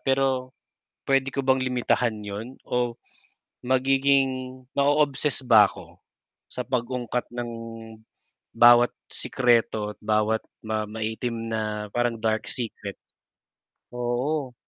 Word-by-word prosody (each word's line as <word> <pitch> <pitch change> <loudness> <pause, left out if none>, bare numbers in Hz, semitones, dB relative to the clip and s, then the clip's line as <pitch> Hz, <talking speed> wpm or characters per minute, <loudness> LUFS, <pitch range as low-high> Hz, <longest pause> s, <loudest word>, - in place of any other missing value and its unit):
pero 135 -1 0 0.6
pwede 135 0 +3
ko 140 - -1
bang 130 0 +3
limitahan 125 -2 +1
yun 105 +6 -7
o 120 -1 -1 0.7
magiging 135 +2 +3 0.5
ma-o-obsess 145 -1 +2
ba 110 -4 +7
ako - - -13 0.5
sa - - -3
pag-ungkat 125 0 -2
ng 120 -1 -4 1.0
bawat 120 +1 +7 0.2
sikreto, 115 -4 +1
at - - -44
bawat 110 +1 +1 0.2
ma 110 -1 -1
maitim 110 +2 -4
na 105 -1 -3
parang 120 0 0
dark 110 0 0
secret. 110 -5 -6 1.0
Oo. 125 +3 -2
120 Hz, 100 wpm, -25 LUFS, 110-130 Hz, 1.0 s, ba